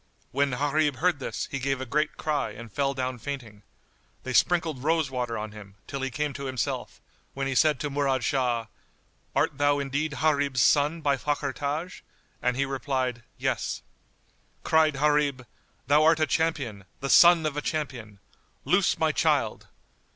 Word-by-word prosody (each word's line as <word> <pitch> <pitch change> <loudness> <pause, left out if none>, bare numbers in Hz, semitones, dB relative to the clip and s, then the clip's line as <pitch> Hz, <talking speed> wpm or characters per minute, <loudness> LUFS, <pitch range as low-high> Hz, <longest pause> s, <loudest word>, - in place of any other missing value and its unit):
When 140 +2 +2
Gharib 145 +2 +1
heard 175 +1 +1
this, - - -4
he 140 - -2
gave 135 0 -1
a 130 - -4
great 150 +4 -1
cry 150 -7 -1
and 115 +1 -10
fell 140 +2 0
down 130 -1 -3
fainting. 120 -5 -7 0.6
They 130 - -4
sprinkled 160 -4 +2
rose 160 -2 +1
water 125 -3 -2
on 105 0 -5
him, 100 -2 -12
till 140 - -5
he 135 - -1
came 145 +3 -2
to 140 0 -6
himself, 130 -6 -3 0.4
when 135 0 -2
he 135 - -1
said 150 +1 +3
to 145 - -2
Murad 135 -3 0
Shah, 125 -5 0 0.7
"Art 140 0 +1
thou 145 0 +3
indeed 145 +2 -2
Gharib's 140 -5 +2
son 150 +3 +3
by 140 -2 +2
Fakhr 145 -1 -2
Taj?"; 150 +6 -4 0.4
and 125 0 0
he 140 - +1
replied, 130 -3 -2 0.2
"Yes." - - -2 0.8
Cried 160 -1 +3
Gharib, 145 -2 +1 0.4
"Thou 145 +4 +4
art 160 0 +5
a 155 - +3
champion, 145 - -1
the 135 - -3
son 170 +2 +7
of 150 -2 -1
a 150 - -1
champion. 130 -10 -4 0.5
Loose - - +3
my - - +2
child!" - - 0
140 Hz, 165 wpm, -27 LUFS, 130-150 Hz, 0.8 s, son